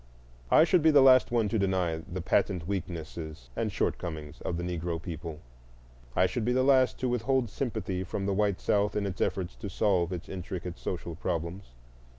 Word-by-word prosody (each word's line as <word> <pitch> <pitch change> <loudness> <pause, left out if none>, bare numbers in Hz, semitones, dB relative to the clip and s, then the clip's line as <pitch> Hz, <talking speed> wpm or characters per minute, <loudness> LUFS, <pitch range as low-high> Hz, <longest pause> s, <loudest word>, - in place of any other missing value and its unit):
I 155 - +7
should 175 +1 +4
be 160 - +5
the 145 -3 +7
last 130 -1 +7
one 115 -3 +2
to 110 - 0
deny 95 -4 +1
the 85 +2 -6
patent 90 -3 +1
weaknesses 80 -8 -5
and - - -1
shortcomings 80 -3 -3
of 85 - -2
the 85 - -3
Negro 85 -1 -2
people; 80 -2 -7 0.7
I 90 - +4
should 95 +6 -1
be 125 +3 +1
the 130 +1 +3
last 130 -3 +4
to 130 - +1
withhold 125 -1 +1
sympathy 100 -8 -2
from 95 +1 -4
the 100 - +1
white 100 -1 +1
South 105 0 +1
in 105 - 0
its 95 -2 -4
efforts 95 -2 -1
to 100 - -6
solve 95 -3 +1
its 90 -1 -5
intricate 90 -1 -6
social 85 -2 -4
problems. 85 +3 -3
95 Hz, 185 wpm, -29 LUFS, 85-110 Hz, 0.7 s, I